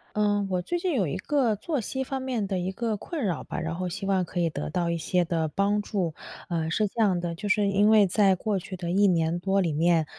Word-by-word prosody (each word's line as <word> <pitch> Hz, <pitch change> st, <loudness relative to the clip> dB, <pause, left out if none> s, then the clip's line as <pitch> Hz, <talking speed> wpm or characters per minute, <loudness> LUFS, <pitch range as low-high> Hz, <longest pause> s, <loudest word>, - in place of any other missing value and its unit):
呃， 205 Hz, -1 st, +2 dB
我 180 Hz, -, +1 dB
最 350 Hz, -, -2 dB
近 350 Hz, 0 st, -1 dB
有 205 Hz, -8 st, +1 dB
一 155 Hz, -, -3 dB
个 255 Hz, 0 st, +1 dB
作 285 Hz, -, -2 dB
息 265 Hz, +4 st, -3 dB
方 265 Hz, 0 st, -3 dB
面 245 Hz, -6 st, -2 dB
的 190 Hz, -2 st, -1 dB
一 180 Hz, +1 st, -2 dB
个 220 Hz, +2 st, -2 dB
困 305 Hz, -, -5 dB
扰 180 Hz, -6 st, -1 dB
吧， -, -, -5 dB
然 165 Hz, 0 st, -3 dB
后 180 Hz, 0 st, -2 dB
希 195 Hz, +3 st, -5 dB
望 190 Hz, -2 st, +2 dB
可 175 Hz, +1 st, -4 dB
以 170 Hz, -1 st, +1 dB
得 -, -, -4 dB
到 170 Hz, +1 st, -1 dB
一 170 Hz, -, -1 dB
些 175 Hz, +2 st, +1 dB
的 165 Hz, -1 st, 0 dB
帮 200 Hz, +6 st, +1 dB
助。 185 Hz, -6 st, -2 dB, 0.3 s
呃， 165 Hz, -3 st, -1 dB
是 210 Hz, +5 st, +1 dB
这 230 Hz, -, -5 dB
样 190 Hz, -5 st, +3 dB
的， 170 Hz, -1 st, -3 dB
就 205 Hz, +4 st, -4 dB
是 200 Hz, 0 st, +3 dB
因 205 Hz, +2 st, +4 dB
为 210 Hz, -3 st, +6 dB
在 195 Hz, +1 st, +4 dB
过 205 Hz, +2 st, -1 dB
去 185 Hz, +1 st, -7 dB
的 175 Hz, -1 st, -4 dB
1 200 Hz, +3 st, +4 dB
年 170 Hz, -2 st, +2 dB
多 195 Hz, +2 st, +1 dB
里 170 Hz, -4 st, 0 dB
面， 165 Hz, +1 st, +3 dB
195 Hz, 275 characters per minute, -26 LUFS, 175-210 Hz, 0.3 s, 为